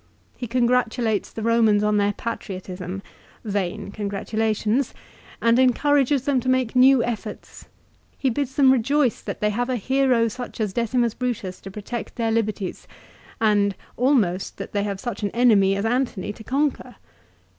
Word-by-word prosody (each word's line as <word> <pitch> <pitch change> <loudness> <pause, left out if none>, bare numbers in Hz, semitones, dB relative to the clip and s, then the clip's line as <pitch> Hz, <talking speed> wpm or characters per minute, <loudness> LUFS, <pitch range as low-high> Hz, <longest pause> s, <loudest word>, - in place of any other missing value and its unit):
He 245 - -6
congratulates 240 -2 +1
the 220 - -6
Romans 225 -2 +3
on 210 0 +2
their 205 0 +2
patriotism, 190 -4 -6 0.4
vain 200 -2 -3
con 205 0 -4
gratulations, 220 +4 -1 0.5
and 230 +1 +4
encourages 275 +1 +3
them 280 -3 +2
to 255 - -2
make 255 -2 +1
new 255 -1 +6
efforts. 235 -2 -6 0.5
He 265 - 0
bids 265 +2 -3
them 270 -2 +6
rejoice 265 +1 +2
that - - -6
they 210 0 +2
have 245 +4 -2
a 255 - +1
hero 255 0 +2
such 245 +2 -7
as 210 -3 -1
Decimus 235 0 +1
Brutus 230 -8 -4
to 195 - -8
protect 210 +4 -6
their 230 -2 0
liberties, 215 -4 -2 0.5
and, 205 -3 +2 0.2
almost 225 -9 +1
that - - -7
they 205 - 0
have 200 -2 -3
such 240 0 -5
an 205 - 0
enemy 210 -5 +4
as 200 +2 -2
Antony 230 -5 -1
to 220 - -12
conquer. 265 -2 -1
230 Hz, 155 wpm, -23 LUFS, 205-255 Hz, 0.5 s, new